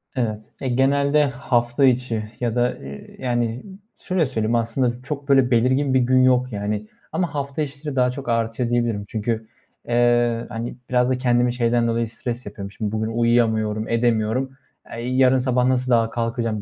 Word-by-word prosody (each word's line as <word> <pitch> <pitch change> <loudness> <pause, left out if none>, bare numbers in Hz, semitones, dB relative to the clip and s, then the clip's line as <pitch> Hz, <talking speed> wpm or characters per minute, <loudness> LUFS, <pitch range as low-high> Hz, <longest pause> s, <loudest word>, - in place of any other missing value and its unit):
Evet. 110 -4 -1 0.2
Eee, 130 - -1
genelde 140 +3 +3
hafta 125 -1 +1
içi 120 -4 0
ya 120 -2 -1
da, 120 0 +2
ııı, 70 0 -9 0.2
yani, 120 -1 -1 0.3
şöyle 180 -3 0
söyleyeyim 115 -3 -1
aslında 120 +1 0
çok 140 0 -6
böyle 135 -2 +4
belirgin 130 +4 +2
bir 130 - +4
gün 130 +1 +3
yok, 125 -1 +3
yani, 105 +1 -3 0.2
ama 165 -1 -1
hafta 140 +1 -3
içleri 145 0 -5
daha 125 -1 +3
çok 135 0 -7
artıyor 115 +1 0
diyebilirim. 120 -4 0
Çünkü, 110 0 -3 0.4
eee, 120 -1 +2
hani, 115 +2 -5
biraz 125 0 +2
da 130 - +1
kendimi 120 -1 +2
şeyden 120 -1 +1
dolayı 115 0 0
stres 120 +2 -5
yapıyorum. 100 -1 -7
Şimdi 105 0 -4
bugün 110 0 -1
uyuyamıyorum, 110 -2 +1
edemiyorum. 115 +3 0 0.4
Eee, 115 - -5
yarın 130 0 +4
sabah 125 -1 +1
nasıl 130 0 +1
daha 115 -1 +3
kalkacağım 115 -2 -2
120 Hz, 165 wpm, -22 LUFS, 115-130 Hz, 0.4 s, böyle